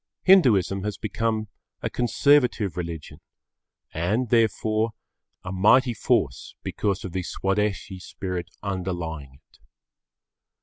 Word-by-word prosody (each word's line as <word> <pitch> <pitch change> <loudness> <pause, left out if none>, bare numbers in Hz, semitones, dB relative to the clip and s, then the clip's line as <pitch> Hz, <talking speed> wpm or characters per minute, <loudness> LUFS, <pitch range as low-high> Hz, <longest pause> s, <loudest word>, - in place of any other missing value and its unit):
Hinduism 105 - +5
has 105 -1 -3
become 110 +1 -2 0.4
a - - -1
conservative 125 - +2
religion 85 -4 -6 0.7
and, 105 +10 0
therefore, 110 -1 +2 0.5
a 95 - -5
mighty 120 +7 +4
force 110 - 0
because 100 -2 -2
of 95 - -5
the 95 +1 -2
Swadeshi 95 +1 -2
spirit 90 -1 -5
underlying 85 -8 -4
it. - - -27
100 Hz, 100 wpm, -25 LUFS, 90-115 Hz, 0.7 s, Hinduism